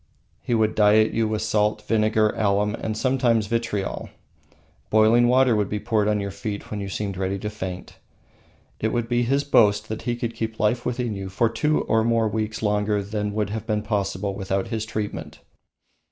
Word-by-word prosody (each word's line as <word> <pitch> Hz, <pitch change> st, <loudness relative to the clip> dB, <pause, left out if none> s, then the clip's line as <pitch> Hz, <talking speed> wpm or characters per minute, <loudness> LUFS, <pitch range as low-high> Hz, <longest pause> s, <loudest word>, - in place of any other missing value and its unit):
He 120 Hz, -, -1 dB
would 110 Hz, -1 st, +2 dB
diet 110 Hz, +1 st, +4 dB
you 115 Hz, -1 st, +1 dB
with 110 Hz, 0 st, -2 dB
salt, 105 Hz, -1 st, +1 dB
vinegar, 110 Hz, -1 st, +2 dB
alum, 105 Hz, 0 st, +1 dB
and 110 Hz, -1 st, -4 dB
sometimes, 125 Hz, -4 st, +2 dB
vitriol. 115 Hz, -3 st, -2 dB, 0.8 s
Boiling 110 Hz, +3 st, +5 dB
water 125 Hz, -1 st, +4 dB
would 105 Hz, -2 st, 0 dB
be 105 Hz, -, -2 dB
poured 105 Hz, -1 st, 0 dB
on 105 Hz, -1 st, +1 dB
your 100 Hz, -1 st, -3 dB
feet 100 Hz, +1 st, -6 dB
when 105 Hz, -, -3 dB
you 100 Hz, -, -4 dB
seemed 100 Hz, -1 st, -3 dB
ready 95 Hz, +1 st, -1 dB
to 105 Hz, +2 st, -5 dB
faint. 95 Hz, -3 st, -7 dB, 0.8 s
It 110 Hz, -, 0 dB
would 120 Hz, -1 st, -1 dB
be 120 Hz, 0 st, +1 dB
his 135 Hz, +4 st, +1 dB
boast 105 Hz, -6 st, +3 dB
that 110 Hz, -, -4 dB
he 120 Hz, 0 st, -1 dB
could 120 Hz, -1 st, -3 dB
keep 110 Hz, -1 st, -4 dB
life 120 Hz, +3 st, +1 dB
within 125 Hz, -2 st, -2 dB
you 95 Hz, -1 st, -5 dB
for 110 Hz, +4 st, +1 dB
two 150 Hz, +7 st, +1 dB
or 110 Hz, 0 st, +1 dB
more 115 Hz, -1 st, +2 dB
weeks 110 Hz, 0 st, -3 dB
longer 105 Hz, 0 st, +1 dB
than 105 Hz, 0 st, -3 dB
would 105 Hz, -2 st, -1 dB
have 110 Hz, +1 st, -5 dB
been 105 Hz, -2 st, 0 dB
possible 100 Hz, -2 st, -2 dB
without 95 Hz, -1 st, -2 dB
his 110 Hz, -1 st, -3 dB
treatment. 105 Hz, -1 st, -5 dB
110 Hz, 190 wpm, -24 LUFS, 105-115 Hz, 0.8 s, Boiling